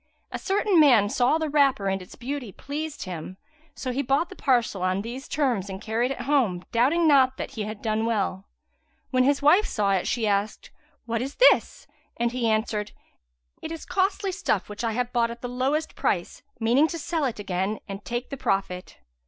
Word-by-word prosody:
A - - -4
certain 395 -2 +2
man 240 -9 +6
saw 250 +7 +2
the 320 -1 -2
wrapper 280 -8 +2
and 195 0 -1
its 180 - -12
beauty 255 -2 -5
pleased 300 +7 -5
him; 185 0 -7 0.4
so 255 - -4
he 265 +3 -1
bought 280 +6 +1
the 380 - -10
parcel 240 - +1
on 185 +2 0
these 245 +4 -7
terms 245 -10 0
and 190 0 -6
carried 225 +4 -1
it 270 -2 -4
home, 245 -10 +1
doubting 290 +9 +3
not 265 -3 +5
that - - -5
he 215 -2 -4
had 215 0 -7
done 220 0 0
well. 200 -3 -1 0.6
When 255 -1 +3
his 280 +1 +2
wife 355 +9 +5
saw 205 -2 0
it 190 -2 +1
she 235 -3 0
asked, 205 0 -1 0.3
"What 230 -1 -1
is 270 +3 -4
this?" - - +4 0.3
and 235 0 0
he 240 -2 0
answered, 215 -1 -1 0.7
"It - - -6
is 330 - -7
costly 385 +1 0
stuff, 365 - -1
which 210 +2 -6
I 225 -1 0
have 245 +1 -2
bought 235 -1 +2
at 235 +1 -9
lowest 260 +6 -1
price, - - -2 0.2
meaning 245 +7 +4
to 335 - -5
sell 330 0 -2
it 250 - -2
again 195 +1 -2
and 195 0 -7
take 240 +3 -4
the 275 - -4
profit." 195 -7 -2
245 Hz, 195 wpm, -25 LUFS, 210-285 Hz, 0.7 s, man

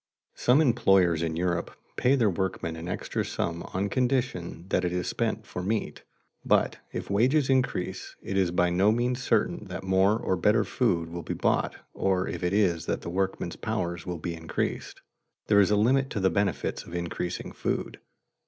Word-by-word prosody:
Some 130 +5 +4
employers 95 - +4
in 80 -1 -1
Europe 85 0 -1 0.2
pay 130 +3 +3
their 115 -7 +3
workmen 85 -2 -2
an 80 +1 -7
extra - - -2
sum 85 0 -3
on 95 +2 -1
condition 120 -8 -1
that 90 - +1
it 90 - 0
is 90 0 -1
spent - - -1
for 90 - -5
meat. 105 +4 -2 0.4
But - - +2
if - - -5
wages 130 +7 +3
increase, 95 -8 -1
it 95 - -4
is 95 -2 +3
by 90 0 +2
no 95 +4 +4
means 120 +3 0
certain 110 -3 +1
that 90 -1 -6
more 95 +3 +3
or 95 - 0
better 105 +5 +3
food 85 -9 0
will 85 0 -5
be - - -4
bought - - +1 0.2
or 95 -1 0
if - - -4
it 90 - +1
is 85 -5 +2
that - - -1
the 85 - -5
workmen's 95 +1 -2
powers 85 -1 -2
will 90 -1 -4
be 85 +2 -4
increased. 80 0 -4 0.4
There 105 -1 +4
is 100 - +5
a 105 - +3
limit 130 +6 +3
to 105 - -3
the 95 -1 +2
benefits 100 0 -1
of 85 - -9
increasing 85 +1 -3
food. - - -3
95 Hz, 185 wpm, -27 LUFS, 85-110 Hz, 0.4 s, is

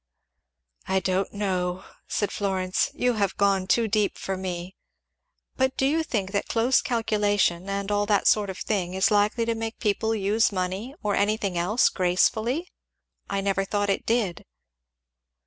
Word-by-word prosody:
"I 190 0 +2
don't 190 +1 -1
know," 185 -2 -2 0.2
said 205 - -1
Florence; 190 -2 0
"you 250 0 +1
have 200 -4 -1
gone 195 -2 +2
too 230 +2 +3
deep 210 -1 0
for 195 - -3
me. 185 0 -5 0.8
But 260 0 +1
do 265 - +2
you 310 +4 +2
think 210 - -2
that 200 0 -1
close 235 +2 +2
calculation, 205 -6 0
and 200 +1 -2
all 205 0 +1
that 205 -1 +2
sort 210 -2 +3
of 190 - -5
thing, 185 -4 -2
is 190 +3 +2
likely 210 +3 +2
to 230 - 0
make 225 0 -4
people 220 +2 0
use 215 +2 +2
money, 190 +7 -3
or 205 -1 0
anything 200 -2 0
else, 185 +8 +3
gracefully? 220 - +1 0.6
I 195 0 -1
never 195 0 0
thought 205 +1 0
it - - -3
did." 225 -7 0
205 Hz, 160 wpm, -25 LUFS, 190-220 Hz, 0.8 s, too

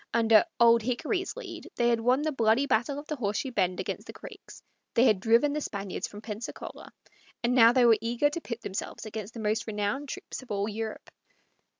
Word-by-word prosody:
Under 225 +1 +5
"Old 235 0 +6
Hickory's" 305 - -2
lead 365 -9 -8
they 240 0 +2
had 235 -1 +2
won 250 +5 +2
the 310 - 0
bloody 230 0 +2
battle 265 +2 0
of 290 - -7
the 305 -1 -4
Horseshoe 230 +3 -2
Bend 185 -5 0
against - - -4
the - - -8
Creeks; - - -12 0.3
they 235 - +5
had 215 -6 +4
driven 230 +8 +3
the 300 - -2
Spaniards 200 -7 -4
from 205 - -11
Pensacola; 215 +1 -7 0.5
and 240 +1 +2
now 230 -2 +7
they 250 -1 +4
were 230 -2 +6
eager 240 +6 +1
to 335 - -4
pit 235 -4 -6
themselves 195 - -5
against 215 0 -7
the - - -6
most 215 +1 -1
renowned 220 +7 -2
troops - - -6
of 260 - -16
all 200 0 -1
Europe. 220 0 -5
230 Hz, 205 wpm, -28 LUFS, 215-265 Hz, 0.5 s, now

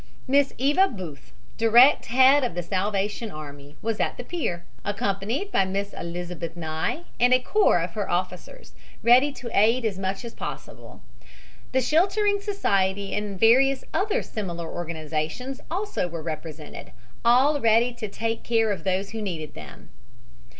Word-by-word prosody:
Miss 280 +1 +3
Eva 295 +9 +3
Booth, 175 - -9 0.3
direct 235 +5 +6
head 265 +4 +5
of 240 -9 -2
the 175 - -2
Salvation 200 +4 -2
Army, 145 -3 -10
was 225 -1 -2
at - - -1
the 245 - -6
pier, 210 - -3 0.2
accompanied 205 - -2
by 195 - +3
Miss 200 +2 -3
Elizabeth 170 -1 -6
Nye 160 - -2 0.2
and 245 +1 +5
a - - +3
corps 255 - +3
of 170 - -4
her 205 +2 -4
officers, 185 - -4 0.3
ready 255 +5 +6
to 245 -4 -8
aid 230 +4 +3
as 200 -4 -1
much 195 +2 -3
as 235 - -7
possible. - - -8 0.7
The 260 - +2
Sheltering 395 - +2
Society 200 - 0
and 205 -2 -3
various 265 +4 +4
other 405 +2 0
similar 170 -6 -5
organizations 165 - -4
also 385 - -2
were 165 -2 -6
represented, 155 -1 -7 0.3
all 265 +5 +4
ready 230 +2 +3
to 235 -2 -5
take 225 +3 -3
care 225 -2 +1
of 185 -5 -4
those 190 +2 -1
who 220 0 -5
needed 165 -7 -5
them. - - -12
210 Hz, 150 wpm, -25 LUFS, 175-255 Hz, 0.7 s, direct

